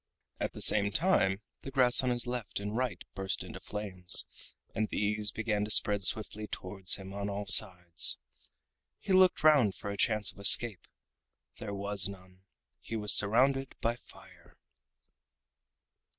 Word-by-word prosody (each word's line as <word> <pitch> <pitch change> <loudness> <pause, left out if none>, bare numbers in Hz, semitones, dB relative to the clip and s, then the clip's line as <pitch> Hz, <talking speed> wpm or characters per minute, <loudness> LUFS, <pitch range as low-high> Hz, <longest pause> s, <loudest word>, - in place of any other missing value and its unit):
At - - -4
the - - -2
same 100 -1 +4
time 105 - 0 0.2
the - - -10
grass 130 -2 +4
on 130 - -1
his 120 0 -2
left 120 -4 -6
and 105 +1 -6
right 125 0 -4
burst 95 0 -4
into - - -11
flames, 95 -4 -3 0.5
and 110 -1 -3
these 105 0 -1
began 110 -2 -3
to - - -9
spread 105 -1 +1
swiftly 105 +1 -2
towards 95 -1 -1
him 95 0 -11
on 100 0 -5
all 100 +1 -6
sides. 90 -6 +4 0.8
He 195 - -4
looked 185 -3 +3
round 145 -10 +3
for 100 - -8
a 100 - -7
chance 105 -2 +1
of - - -20
escape. 100 +1 +6 0.7
There 100 -2 -7
was 100 0 -2
none. 95 -1 -15 0.4
He 115 - -9
was 105 -2 +2
surrounded 130 +6 +1
by 115 +1 -2
fire. 120 - -20
105 Hz, 150 wpm, -29 LUFS, 100-120 Hz, 0.8 s, escape